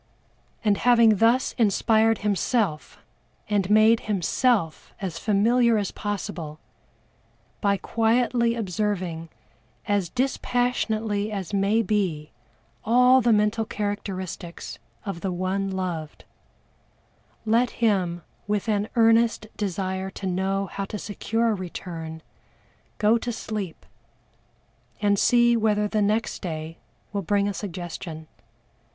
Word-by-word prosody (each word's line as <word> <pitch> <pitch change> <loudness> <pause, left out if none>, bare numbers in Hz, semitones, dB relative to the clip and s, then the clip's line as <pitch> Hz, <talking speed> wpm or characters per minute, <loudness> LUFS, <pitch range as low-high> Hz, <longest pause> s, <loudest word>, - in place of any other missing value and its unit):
And 205 -2 +3
having 235 -3 +5
thus 230 +5 +3
inspired 220 +1 +3
himself, 200 -4 0 0.5
and 200 -3 0
made 215 +2 +5
himself 205 - 0
as 180 -5 -4
familiar 230 +3 +3
as 205 -2 -1
possible, 175 -7 -5 1.0
by 200 -1 +2
quietly 235 +2 +1
observing 185 -5 -2 0.6
as 200 -4 +1
dispassionately 225 -4 -1
as 195 -1 -5
may 200 +3 +2
be 185 -9 -1 0.5
all 250 +3 +5
the 235 0 +3
mental 210 +1 +2
characteristics 195 -5 -5 0.3
of 195 -5 -5
the 190 - -2
one 185 +2 -1
loved, 175 -5 -4 1.2
let 230 +3 +3
him 185 -8 0 0.2
with 210 +1 -1
an 210 -1 0
earnest 225 -1 +4
desire 190 -1 -2
to 195 - -8
know 190 +2 0
how 195 0 -5
to 210 - -6
secure 225 +3 -1
a - - +1
return, 165 -4 -6 0.7
go 220 +2 +3
to 240 - -3
sleep, 210 -6 -5 1.1
and 205 -1 +2
see 240 -1 +4
whether 210 -2 +2
the 215 0 0
next 215 +3 0
day 160 -2 -5 0.3
will 200 - -1
bring 200 +2 +1
a 205 - -1
suggestion. 175 -4 -6
205 Hz, 110 wpm, -25 LUFS, 185-225 Hz, 1.2 s, having